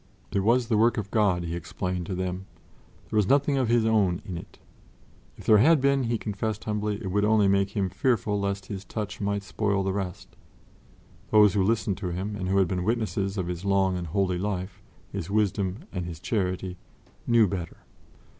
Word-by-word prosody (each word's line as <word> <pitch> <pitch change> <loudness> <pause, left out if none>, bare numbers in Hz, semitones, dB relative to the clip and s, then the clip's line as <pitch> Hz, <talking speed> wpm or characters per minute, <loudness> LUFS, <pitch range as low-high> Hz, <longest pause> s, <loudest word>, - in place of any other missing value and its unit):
It - - +1
was 115 +4 +2
the 110 -3 +2
work 120 +2 +3
of 105 -2 -4
God, 100 -6 +2
he 85 0 -3
explained 90 0 -4
to 95 - -3
them; 95 +1 -3 0.6
there 110 - 0
was 105 -3 +3
nothing 140 0 +3
of 130 -3 +1
his 115 -1 +3
own 100 -6 +2
in 95 -5 -5
it. 85 - -9 0.8
If - - -12
there 105 -1 +6
had 155 +7 +6
been, 140 -1 +2
he 115 0 0
confessed 105 0 -3
humbly, 105 -1 -1
it 95 -5 -5
would 105 +2 +1
only 105 -1 +4
make 100 +1 +1
him 95 -2 +1
fearful 105 +2 0
lest 100 -1 -2
his 100 -2 -6
touch 105 +1 -5
might 100 0 -1
spoil 100 0 0
the 95 0 -1
rest. 95 -3 -5 0.9
Those 105 -2 +6
who 100 - +2
listened 105 -1 0
to 100 - -3
him 95 +4 -3
and 95 -2 -4
who 95 - +2
had 95 -2 +4
been 90 0 -2
witnesses 105 -2 -1
of 95 - -1
his 90 +1 -5
long 95 -1 +2
and 90 -1 -4
holy 90 +1 0
life, 95 0 -3 0.3
his 95 -3 -5
wisdom 100 - 0
and 90 -2 -3
his 85 -3 -7
charity, 95 -2 -2 0.5
knew 115 -2 +5
better. 90 -3 -5
100 Hz, 200 wpm, -26 LUFS, 95-110 Hz, 0.9 s, there